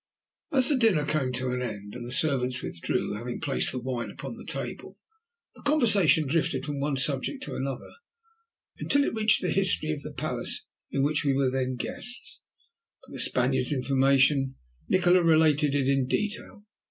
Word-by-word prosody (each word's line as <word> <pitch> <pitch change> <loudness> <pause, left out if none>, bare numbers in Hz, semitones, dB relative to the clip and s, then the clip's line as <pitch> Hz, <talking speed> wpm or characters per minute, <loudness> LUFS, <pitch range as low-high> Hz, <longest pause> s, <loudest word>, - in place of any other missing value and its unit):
At - - -4
last 260 -2 +4
the 290 - +3
dinner 210 - +3
came 150 -4 0
to 125 0 -2
an 125 0 -2
end, 105 -4 -6
and 120 - -7
the 120 - -7
servants 130 -3 0
withdrew, 85 - -2
having 120 +3 -5
placed 140 - 0
the - - -5
wine 120 -3 -4
upon 165 - -8
the 230 - -11
table. - - -5 0.6
The - - -16
conversation 205 - +4
drifted 140 -2 0
from 145 -1 -4
one 140 0 -1
subject 140 - 0
to - - -6
another 135 -1 -4 0.9
until 285 0 +3
it - - -1
reached 215 -2 +3
the 180 - 0
history 185 -4 +2
of 150 -2 -4
the - - -8
palace - - -3 0.2
in 135 - 0
which 150 +1 +1
we 140 -2 +2
were 135 -2 +1
then 130 -1 -1
the - - -3
guests. 245 0 -6 0.6
For - - -17
the - - -7
Spaniard's - - +1
information 135 0 +2 0.3
Nikola 180 0 +4
related 155 -3 +3
it 135 -2 +1
in 135 -2 +2
detail. 210 +4 -3
140 Hz, 180 wpm, -27 LUFS, 130-175 Hz, 0.9 s, last